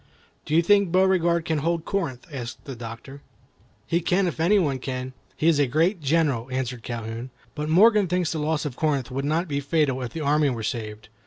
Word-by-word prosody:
"Do 155 - -1
you 170 - +5
think 200 0 +4
Beauregard 175 -3 +3
can 160 -2 0
hold 165 +2 -1
Corinth?" 165 -11 -3
asked 120 -2 -7
the 135 -3 -6
Doctor. 115 +4 -9 0.6
"He 170 +1 0
can 185 +3 +2
if 175 - -3
any 180 +6 +4
one 145 -8 +1
can. 130 0 -5 0.2
He 155 - +1
is 160 -3 +4
a 145 - +3
great 165 - +1
general," 140 -5 +1
answered 125 -2 -3
Calhoun. 115 +1 -5 0.2
"But 150 0 -4
Morgan 210 +4 +5
thinks 180 -1 0
the 160 - -2
loss 150 0 -1
of 140 -4 -4
Corinth 140 -5 -1
would 135 +2 -2
not 160 +5 0
be 140 -2 -1
fatal 140 -2 0
if 125 -2 -4
the 165 - -4
army 150 0 +2
were 115 -4 -4
saved. 110 -1 -5
150 Hz, 210 wpm, -24 LUFS, 130-170 Hz, 0.6 s, you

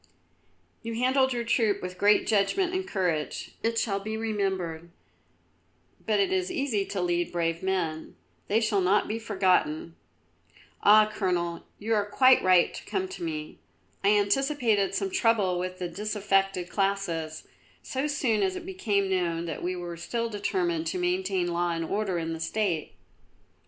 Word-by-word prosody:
"You 230 0 -5
handled 260 +2 +2
your 240 -1 -1
troop 225 -3 +1
with 180 0 -7
great 205 +1 +4
judgment 290 - +1
and 375 0 -2
courage. 175 - -2
It 230 0 0
shall 200 -4 0
be 215 +2 -4
remembered. 190 -7 -2 1.2
But - - +2
it 390 -2 +2
is 375 0 0
easy 270 - -1
to 200 - -3
lead 175 -1 0
brave 165 -1 -1
men; 175 -5 -2 0.3
they 215 - +3
shall 215 -3 +1
not 190 +3 +2
be 220 +2 -3
forgotten. 185 -7 +1 0.9
Ah, 215 +1 +7
Colonel, 175 -3 -2
you 225 +2 -1
are 205 -1 +1
quite 260 +3 +5
right 185 -2 +4
to - - -8
come 380 -1 -2
to - - -8
me. 155 -2 -5 0.4
I - - +3
anticipated 220 -1 +2
some 390 -1 -1
trouble 225 - +2
with 185 0 -4
the 180 - -3
disaffected 195 -1 0
classes, 185 -6 -2 0.4
so 265 +3 -2
soon 260 -7 +1
as 375 -1 +1
it 365 -2 -7
became 215 - 0
known 170 -3 -1
that 160 -3 -5
we 180 +1 -2
were 175 -1 -6
still 230 +7 -3
determined 180 -6 -1
to 165 - -2
maintain 180 0 0
law 175 0 0
and 165 0 -2
order 195 0 -1
in 165 -1 -2
the 165 - -6
State." 170 -1 -1
195 Hz, 160 wpm, -27 LUFS, 175-225 Hz, 1.2 s, Ah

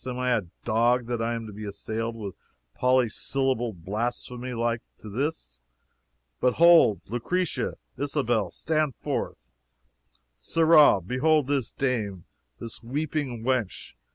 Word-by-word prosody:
am 125 -1 -3
I 125 0 0
a 110 - +1 0.2
dog 120 +2 +2
that 120 -1 -2
I 115 +1 0
am 115 -1 -5
to 105 - -9
be 105 +2 -8
assailed 110 +3 -4
with 105 -4 -6 0.4
polysyllabled 125 -4 0
blasphemy 120 +4 -3
like 115 0 0 0.2
to 110 - -10
this? 120 - -4 0.8
But 125 -1 +3
hold! 165 - +6
Lucretia, 170 - -1 0.2
Isabel, 120 - 0
stand 155 - -1
forth! - - -4 0.9
Sirrah, 160 - +5
behold 140 - +2
this 140 -3 -1
dame, 110 -9 -2 0.3
this 115 -2 -8
weeping 135 -1 -3
wench. 125 -5 -1
120 Hz, 125 wpm, -26 LUFS, 110-135 Hz, 0.9 s, hold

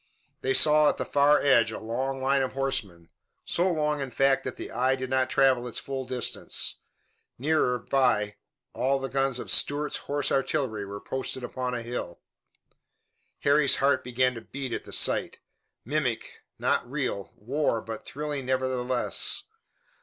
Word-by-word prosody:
They 395 - +1
saw 150 - +7
at - - -2
the - - -2
far 145 +1 +4
edge 120 -6 +4
a - - -5
long 130 +4 -3
line 135 +1 +3
of 130 - -2
horsemen, 100 -11 -3 0.4
so 180 +2 +1
long, 150 -2 0
in 135 -1 -3
fact, 135 +2 +2
that 130 - -4
the - - -7
eye 130 +3 +1
did 130 0 -6
not 130 0 +1
travel 130 -3 +3
its 120 - -4
full 135 -1 -3
distance. 125 -2 -1 0.6
Nearer 135 -2 +1
by, 110 -5 +1 0.4
all 135 +1 +1
the 135 0 -4
guns 135 -1 +1
of - - -5
"Stuart's 145 +1 +2
Horse 145 0 -2
Artillery" 130 -6 -1
were 100 +1 -7
posted 130 +1 -5
upon 125 0 -3
a 120 - -4
hill. 115 -7 -5 1.2
Harry's 140 0 +4
heart 140 +1 +2
began 125 +1 +1
to 115 - -8
beat 130 +1 -6
at - - -4
the - - -11
sight - - +2 0.5
mimic, 130 -3 -2 0.2
not 120 - 0
real, 130 -8 -3
war, 130 +1 -1
but 115 0 -7
thrilling 145 -2 -5
nevertheless. 130 -1 0
130 Hz, 160 wpm, -27 LUFS, 125-140 Hz, 1.2 s, saw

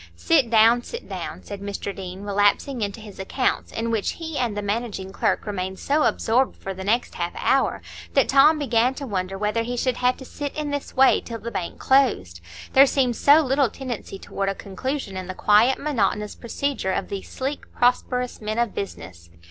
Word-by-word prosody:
"Sit 290 -8 +2
down, 230 +1 +5
sit 470 - -8
down," - - -6
said 200 -1 -8
Mr 200 0 -5
Deane, 190 0 -7
relapsing 205 +5 +1
into 205 +1 -3
his 210 -3 -12
accounts, 255 +7 -1
in 230 +1 -2
which 220 -3 0
he 320 -2 -7
and 235 -6 -1
the 205 - -2
managing 205 -2 -3
clerk - - 0
remained 190 -2 -3
so 295 +8 +1
absorbed 250 +4 +1
for 195 - -5
the 190 0 -7
next 230 +5 0
half 175 0 -3
hour 270 - +1 0.3
that 275 - +4
Tom 285 +3 +6
began 255 -2 +2
to 280 - -6
wonder 195 -4 -3
whether 210 +3 0
he 245 +2 -3
should 255 0 0
have 250 0 +2
to 265 - -10
sit 285 +2 -6
in 300 -1 -3
this 285 -1 -4
way 265 0 +5
till 230 - -6
the 230 +1 -7
bank 175 - -4
closed,—there 90 - +2
seemed 255 -3 +1
so 290 +6 +6
little 270 -2 +2
tendency 240 -5 -6
toward 195 0 -3
a 195 - -2
conclusion 215 +3 -4
in 185 -1 -5
the 185 - -6
quiet, 215 +7 +4
monotonous 210 -7 -1
procedure 250 -3 -2
of - - -2
these 195 -1 -6
sleek, 275 +2 -5
prosperous 250 0 0
men 215 +1 -3
of 235 -2 0
business. 85 - -7
230 Hz, 195 wpm, -23 LUFS, 195-265 Hz, 0.3 s, Tom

